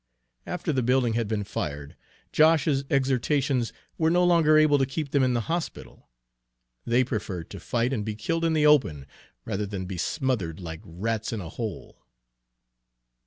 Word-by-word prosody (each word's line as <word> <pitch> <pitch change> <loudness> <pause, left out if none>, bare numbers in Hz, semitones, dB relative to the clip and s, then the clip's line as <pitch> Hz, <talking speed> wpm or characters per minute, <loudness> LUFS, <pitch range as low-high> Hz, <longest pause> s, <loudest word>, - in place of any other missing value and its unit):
After 175 -3 -2
the 130 - +1
building 125 -1 +2
had 115 -1 0
been 105 -1 -1
fired, 70 -6 -5 0.4
Josh's 155 -3 +3
exhortations 135 -1 +1 0.3
were 160 -1 +3
no 175 +2 +3
longer 165 -3 +5
able 155 -2 +5
to 135 - +3
keep 140 +1 -4
them 140 - +3
in 130 -1 +2
the 120 - +1
hospital. 165 +7 -5 0.8
They 120 +2 +4
preferred 100 -8 -4
to 100 - -7
fight 120 +7 -1
and 110 -5 -1
be 110 0 -4
killed 165 +10 -2
in 165 -1 +2
the 155 -1 +3
open, 125 - +3 0.4
rather 105 -1 -2
than 100 -2 -4
to - - -7
be 95 -1 -5
smothered 115 - -1
like 80 -2 -7
rats 110 +6 -3
in 115 - -3
a 85 -4 -6
hole. 110 +3 -6
125 Hz, 170 wpm, -26 LUFS, 105-150 Hz, 0.8 s, longer